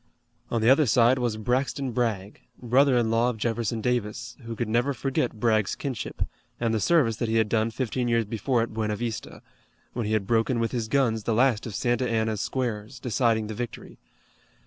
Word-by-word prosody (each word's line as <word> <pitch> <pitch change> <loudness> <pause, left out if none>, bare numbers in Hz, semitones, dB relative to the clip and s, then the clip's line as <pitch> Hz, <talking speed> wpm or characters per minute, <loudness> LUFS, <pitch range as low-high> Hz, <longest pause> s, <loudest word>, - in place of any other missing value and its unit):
On 115 - 0
the 115 - +5
other 140 +1 +4
side 120 +2 +4
was 120 -3 -1
Braxton 130 +4 -1
Bragg, 110 -4 -2 0.2
brother 130 +2 +3
in 115 -2 +1
law 115 +2 +3
of 120 - -4
Jefferson 115 0 -1
Davis, 120 -3 -2
who 115 0 -5
could 120 0 -2
never 120 +5 +1
forget 125 -3 -1
Bragg's 110 -3 +2
kinship, 130 -7 -4 0.4
and 115 -1 0
the 110 - +1
service 125 -4 +3
that 120 -3 -2
he 110 - 0
had 110 -1 +3
done 110 +1 +1
fifteen 125 +1 -2
years 115 -1 +2
before 115 +3 0
at 115 - -6
Buena 110 -1 -1
Vista, 115 +1 -5 0.5
when 120 -3 -2
he 110 - -1
had 110 -3 +1
broken 115 +3 +1
with 115 0 0
his 120 -3 -2
guns 115 -4 +1
the 115 - +1
last 120 -2 +2
of 105 - -6
Santa 120 +3 0
Anna's 110 -2 0
squares, 120 -2 -3
deciding 115 -2 +1
the 110 - -5
victory. 120 +1 -7
115 Hz, 195 wpm, -26 LUFS, 110-125 Hz, 0.5 s, the